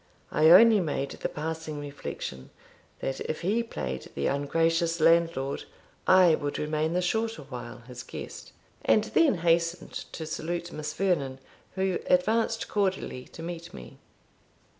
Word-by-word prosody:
I 155 +1 +5
only 220 +5 +8
made 145 -5 -2
the - - -4
passing 160 0 -4
reflection, 140 - -6 0.5
that 135 - -2
if 155 - -4
he 205 +7 +1
played 65 - -5
the 70 - -1
ungracious 165 +4 +1
landlord, 165 -4 +2 0.4
I 185 -3 +7
would 145 -2 -2
remain 155 +1 -1
the 180 +1 +1
shorter 225 +4 -1
while - - -8
his - - -8
guest, - - -8 0.3
and - - +4
then 310 -9 +3
hastened 170 +1 +1 0.2
to 160 - -5
salute 170 +2 -4
Miss 150 0 -5
Vernon, 150 -9 0 0.4
who 190 -1 0
advanced 225 +5 +2
cordially 190 -10 -1
to 165 - -11
meet 170 - -7
me. 60 -2 -11
165 Hz, 140 wpm, -28 LUFS, 150-185 Hz, 0.5 s, only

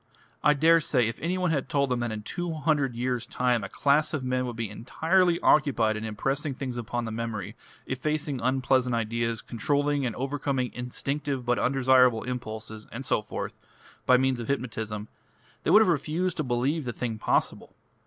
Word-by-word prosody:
I 150 - +5
daresay 160 -5 +4
if 115 - -4
any 175 +3 -1
one 180 -2 +1
had 140 -4 -1
told 140 -2 +1
them 125 - +1
that 120 -1 -2
in 105 -1 -5
two 175 +8 -3
hundred 145 -4 +1
years' 125 0 -2
time 125 -3 +1
a 100 - -5
class 145 +2 +2
of 140 - -3
men 130 0 0
would 120 - -5
be 115 -1 -2
entirely 170 - +1
occupied 120 -7 +3
in 110 - -4
impressing 135 +6 -2
things 130 -3 -4
upon 120 +1 -3
the 115 - -4
memory, 110 -3 -4 0.3
effacing 145 0 -2
unpleasant 130 0 +2
ideas, 115 0 -1
controlling 145 +4 0
and 120 -4 -2
overcoming 135 -1 -2
instinctive 135 +2 -3
but 120 0 +1
undesirable 125 -3 +4
impulses, 110 -3 -6
and 135 +4 -5
so - - +2
forth, 105 - -5 0.5
by 130 - +7
means 130 -1 +1
of 115 - -5
hypnotism, 110 -5 -3 0.5
they - - -2
would 215 - +8
have - - 0
refused 165 +2 0
to 155 - 0
believe 130 +4 0
the 120 - -3
thing 115 -3 -4
possible. - - -1
130 Hz, 180 wpm, -27 LUFS, 115-145 Hz, 0.5 s, would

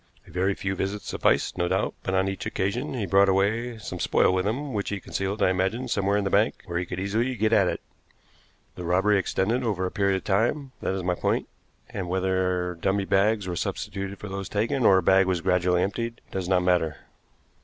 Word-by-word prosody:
A - - -16
very 95 +3 0
few 95 0 -2
visits 95 +2 -3
sufficed, - - +1
no 90 - +1
doubt; - - 0
but 95 - -2
on 95 +1 +2
each 95 0 -3
occasion 120 +10 -2
he 110 -5 -2
brought 95 +1 +4
away 110 +5 +1
some 110 - -7
spoil - - +3
with 95 +1 0
him, 135 +5 -2
which 100 -2 -2
he 100 - -3
concealed, 95 +2 -2
I 95 - +4
imagine, 95 +7 -1
somewhere 100 -3 +1
in 105 - 0
the 95 - -2
bank, 105 +3 +2
where 85 0 -2
he 90 - -4
could 90 - -5
easily 110 +7 0
get 110 0 +1
at 100 -4 +5
it. - - -2 0.9
The 90 - -8
robbery 95 +4 +3
extended 105 +6 0
over 100 -6 -1
a 90 - -3
period 100 -1 +1
of - - -7
time, 120 +8 0
that 95 - -1
is 95 - -3
my 90 0 +1
point, - - -1 0.4
and 90 -3 -4
whether 90 -1 0
dummy 95 0 +1
bags 100 +1 +2
were 90 - -3
substituted 100 +3 -4
for 105 - -8
those 95 -1 -5
taken, 115 +4 +1
or 95 - +6
a 95 - +1
bag 95 0 +5
was 90 -2 +1
gradually 90 0 +2
emptied, 115 +4 -3
does 95 -2 -3
not 90 -1 +3
matter." 90 -4 +1
95 Hz, 220 wpm, -26 LUFS, 95-105 Hz, 0.9 s, or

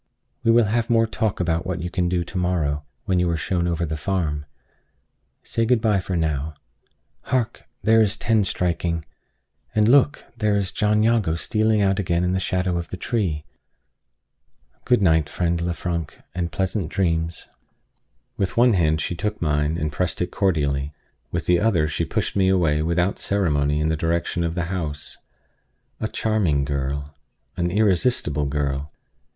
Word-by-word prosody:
We 115 - +2
will 115 0 +6
have 115 +3 0
more 115 -1 +4
talk 110 -2 -1
about 85 -1 0
what 90 -2 -3
you 90 - -4
can 90 -2 0
do 90 -1 0
to 95 - -7
morrow, 75 -5 0 0.2
when 95 -3 +1
you 90 -1 +2
are 85 - 0
shown 85 +2 -1
over 85 0 0
the 80 0 -3
farm. 75 -3 -2 1.0
Say 115 - -1
good 120 +1 +3
by 105 -4 +2
now. 80 -2 -1 0.7
Hark! 120 -3 -1 0.2
there 115 0 +5
is 110 0 +3
ten 110 -2 +2
striking! 85 -3 -1 0.7
And 105 0 +4
look! 140 +4 +4 0.2
here 105 -1 +3
is 100 -2 0
John 105 0 +2
Jago 110 -8 +2
stealing 110 +4 +1
out 95 0 +2
again 85 -2 +1
in 90 - +1
the 95 - +1
shadow 90 -1 0
of 85 - -6
the 95 - -5
tree! 90 -9 -1 1.4
Good 120 -5 +3
night, 80 -4 +3
friend 85 +1 -1
Lefrank; 85 -1 -3
and 85 -2 -2
pleasant 95 -2 -1
dreams." 85 -3 -1 0.9
With 95 0 -2
one 120 0 +6
hand 80 -4 +2
she 85 - -2
took 105 +5 -3
mine, 75 0 0
and 75 -2 -2
pressed 90 +3 -1
it 90 0 -1
cordially; 75 -7 0 0.4
with 85 - -2
the 90 -1 +3
other 90 -8 +2
she 75 - -1
pushed - - -2
me 95 -1 +3
away 80 -5 +2
without 85 +4 0
ceremony 75 -7 +1
in 75 +1 +1
the 80 - +1
direction 85 +2 -1
of 85 0 -2
the 85 - 0
house. 75 -5 -4 0.8
A 110 - -1
charming 95 -13 +1
girl 70 +1 -3 0.4
an 85 -1 0
irresistible 95 - +2
girl! 70 0 -2
85 Hz, 165 wpm, -23 LUFS, 80-100 Hz, 1.4 s, will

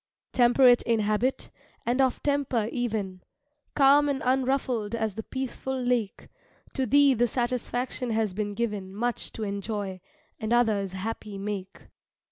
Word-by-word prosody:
Temperate 245 0 +5
in 230 -2 +1
habit, 215 +5 0 0.3
and 245 +3 +2
of 260 -2 +1
temper 280 -6 0
even, 210 -7 -3 0.5
Calm 285 +1 +5
and 275 -1 -2
unruffled 255 -4 0
as 220 -2 -1
the 220 - -5
peaceful 265 +2 -4
lake, 245 -5 -1 0.5
To 265 -2 -1
thee 285 +3 +5
the 240 0 +2
satisfaction 245 +1 -2
has 220 -3 0
been 205 +1 -3
given 205 -4 -3
Much 240 +3 -2
to 220 - -5
enjoy, 200 -2 -4 0.4
and 220 +1 -3
others 210 -6 +2
happy 205 +1 -5
make. 195 -1 -5
235 Hz, 135 wpm, -27 LUFS, 210-255 Hz, 0.5 s, Temperate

